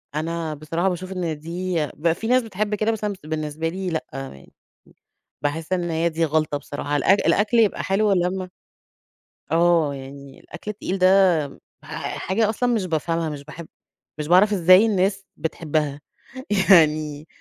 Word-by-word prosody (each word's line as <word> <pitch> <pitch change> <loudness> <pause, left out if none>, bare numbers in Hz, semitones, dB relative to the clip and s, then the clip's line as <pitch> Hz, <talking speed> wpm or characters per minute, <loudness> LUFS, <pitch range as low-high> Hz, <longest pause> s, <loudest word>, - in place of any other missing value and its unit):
أنا 165 0 -2
بصراحة 165 +5 -1
باشوف 185 +1 -5
إن 170 -5 -3
دي 175 +3 -4
بيبقى 165 +2 -1
في 220 - -5
ناس 255 +1 +3
بتحب 210 -1 -2
كده 215 +2 0
مثلًا، 210 -2 -2
بس 190 - -14
أنا 155 - -11
بالنسبة 155 +1 -3
لي 185 +2 -4
لأ، 160 -2 -3
يعني 135 - -9 0.9
باحس 155 +5 -2
إن 175 -1 -1
هي 165 +1 +1
دي 165 +1 0
غلطة 155 -1 0
بصراحة. 145 0 -4
الأك 195 +8 +4
الأكل 215 +3 +2
يبقى 215 -3 +2
حلو 200 +2 +1
لمّا 185 0 -1 1.0
آه، 165 -3 +3
يعني 135 0 -11
الأكل 190 +5 -8
التقيل 195 -2 -4
ده 185 -5 +4 0.4
ح - - -5
حاجة 215 +3 0
أصلًا 245 +2 0
مش 205 -5 0
بافهمها، 165 0 -1
مش 145 -2 -7
باحب 155 +3 -10 0.5
مش 150 -1 -4
باعرف 190 +5 +5
إزاي 185 +3 +6
الناس 195 -2 0
بتحبها. 150 -3 -2 0.7
يعني 155 -3 +4
170 Hz, 160 wpm, -23 LUFS, 155-190 Hz, 1.0 s, إزاي